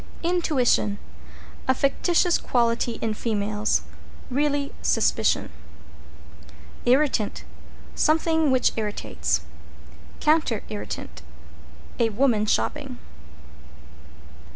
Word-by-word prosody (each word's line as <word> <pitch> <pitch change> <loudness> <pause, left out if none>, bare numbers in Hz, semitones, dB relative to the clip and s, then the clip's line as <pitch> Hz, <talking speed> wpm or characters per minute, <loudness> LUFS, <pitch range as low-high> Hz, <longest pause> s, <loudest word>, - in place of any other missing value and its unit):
=INTUITION= 295 - +2 0.7
A 260 - +3
fictitious 345 +6 +2
quality 235 -1 +1
in 225 -1 0
females 210 -1 0 0.5
really 285 +1 0
Suspicion. - - +1 1.4
=IRRITANT= 255 -5 +2 0.5
Something 320 0 +2
which 255 -1 +3
irritates. 210 -2 -1 0.8
=COUNTER 305 -8 +2
IRRITANT= 75 - -6 0.8
A 230 -1 +3
woman 220 -1 +2
shopping. 270 +2 -1
255 Hz, 70 wpm, -24 LUFS, 215-300 Hz, 1.4 s, A